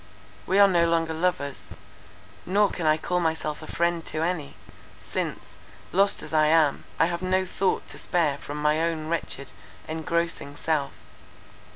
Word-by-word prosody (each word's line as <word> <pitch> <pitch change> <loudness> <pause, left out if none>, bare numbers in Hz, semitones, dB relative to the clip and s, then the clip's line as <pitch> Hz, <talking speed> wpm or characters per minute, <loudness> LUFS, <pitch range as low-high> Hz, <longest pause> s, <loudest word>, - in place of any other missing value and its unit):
We 190 - +2
are 200 0 +8
no 170 -3 +3
longer 165 -1 +1
lovers; 160 -4 -1 0.8
nor 200 +2 +2
can 165 -3 -2
I 155 0 +4
call 180 +3 -1
myself 160 -2 -1
a 155 - -9
friend 170 -1 0
to 155 - -2
any; 165 -5 -2 0.4
since, - - -5 0.3
lost 195 +2 +3
as - - -9
I 155 -1 +4
am, 155 -2 +3
I - - +4
have 170 +1 -2
no 185 0 +1
thought 190 +1 -1
to - - -7
spare 155 -6 0
from 145 +1 -6
my 150 +1 +2
own 160 -2 -1
wretched, 140 -5 -2 0.4
engrossing 160 -2 -2
self. 145 -3 -1
165 Hz, 160 wpm, -26 LUFS, 155-175 Hz, 0.8 s, are